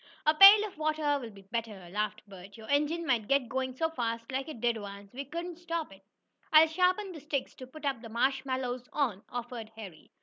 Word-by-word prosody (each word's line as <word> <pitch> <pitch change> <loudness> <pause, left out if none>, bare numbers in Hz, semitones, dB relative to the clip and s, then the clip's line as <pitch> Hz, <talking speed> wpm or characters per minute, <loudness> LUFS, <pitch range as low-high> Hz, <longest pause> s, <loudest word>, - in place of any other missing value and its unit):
"A 305 - +5
pail 400 +5 +9
of 395 -7 -10
water 305 -2 +1
will 240 -4 -7
be 200 -2 -15
better," 210 -3 -5
laughed 210 +1 -2
Bert. 195 +1 -12
"Your 220 -1 -11
engine 300 +4 +1
might 235 -7 +1
get 275 -3 +2
going 260 +1 -2
so 320 +5 +1
fast, 230 -4 -3
like 265 +2 -2
it 300 - -8
did 235 0 +1
once, 200 -1 -9
we 270 +3 -5
couldn't 340 +4 -6
stop 335 - -4
it." 195 - -17 0.5
"I'll 315 +1 +9
sharpen 365 +4 +1
the 325 - -9
sticks 285 -2 -3
to 255 - -9
put 310 +4 -13
the 250 -5 -2
marshmallows 255 0 -1
on," 240 -10 0
offered 240 -2 -6
Harry. 195 -8 -11
260 Hz, 205 wpm, -30 LUFS, 225-310 Hz, 0.5 s, pail